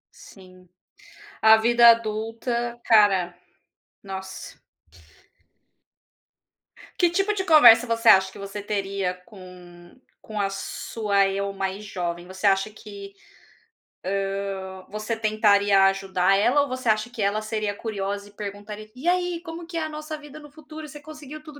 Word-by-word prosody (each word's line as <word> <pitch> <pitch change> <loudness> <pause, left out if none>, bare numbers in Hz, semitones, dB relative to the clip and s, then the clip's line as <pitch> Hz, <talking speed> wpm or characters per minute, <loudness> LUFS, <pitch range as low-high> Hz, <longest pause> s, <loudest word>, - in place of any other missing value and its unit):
Sim. 185 -2 -16 0.7
A 220 0 +8
vida 235 +1 +5
adulta, 230 +2 -2
cara, 195 -5 +3 0.6
nossa. 190 -1 -8 2.4
Que 350 - +4
tipo 390 +4 0
de 385 -2 -2
conversa 250 -8 +7
você 230 0 -1
acha 190 0 +6
que - - -14
você 200 +1 -6
teria 195 -2 -2
com 180 -4 -14 0.3
com 215 -1 -7
a 195 -1 0
sua 200 0 -1
eu 200 +1 -2
mais 195 +1 -4
jovem? 175 -3 -5
Você 190 +2 -2
acha 195 +1 +2
que, 200 -2 -11 1.5
hã, 190 0 -10
você 215 +2 -4
tentaria 205 -2 +3
ajudar 195 0 +1
ela 245 +8 +3
ou 285 - -3
você 255 -1 -4
acha 215 +2 +1
que 240 - -9
ela 205 +2 0
seria 215 -2 -3
curiosa 200 -2 -5
e - - -20
perguntaria: 205 +1 -8
"E 265 +7 -4
aí, 355 -1 0
como 330 0 -8
que 340 0 -8
é 330 - -1
a 315 - -3
nossa 305 0 -6
vida 295 0 -12
no 295 -1 -14
futuro? 310 +1 -11
Você 295 +1 -11
conseguiu 305 0 -11
tudo 305 -2 -13
215 Hz, 145 wpm, -24 LUFS, 195-250 Hz, 2.4 s, A